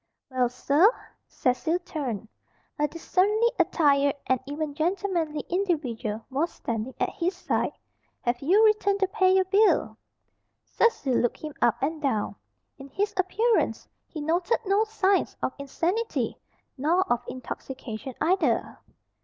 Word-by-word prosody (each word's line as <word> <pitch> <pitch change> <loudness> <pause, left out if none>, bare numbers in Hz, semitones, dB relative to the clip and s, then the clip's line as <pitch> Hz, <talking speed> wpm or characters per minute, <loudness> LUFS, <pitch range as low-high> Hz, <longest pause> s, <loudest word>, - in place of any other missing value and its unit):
"Well, 250 -2 +2
sir?" 290 - +4 0.4
Cecil 315 +7 0
turned. 245 - -4 0.5
A 295 - +3
decently 405 +8 +2
attired, 280 -3 +3
and 260 -1 +2
even 290 +1 -3
gentlemanly, 335 -1 -1
individual 275 - -2
was 295 +6 0
standing 230 +2 -4
at - - 0
his 360 +2 -2
side. - - -1 0.5
"Have 240 0 -1
you 385 +10 +5
returned 410 -2 +3
to 385 - +4
pay 375 0 +3
your 380 0 +4
bill?" 405 +3 +3 0.7
Cecil 295 - +1
looked 240 0 +1
him 305 -1 -7
up 235 -3 +4
and 310 +2 -1
down. 220 -8 -1 0.4
In 275 +1 -10
his 410 +9 -1
appearance 430 +5 +1 0.2
he 310 - -7
noted 345 +7 +1
no 400 +3 +3
signs 400 -3 +1
of 260 - -2
insanity, 350 +11 -1 0.4
nor 330 +7 +3
of 240 0 -3
intoxication 255 -1 -7
either. 365 +4 +1
315 Hz, 130 wpm, -26 LUFS, 265-380 Hz, 0.7 s, you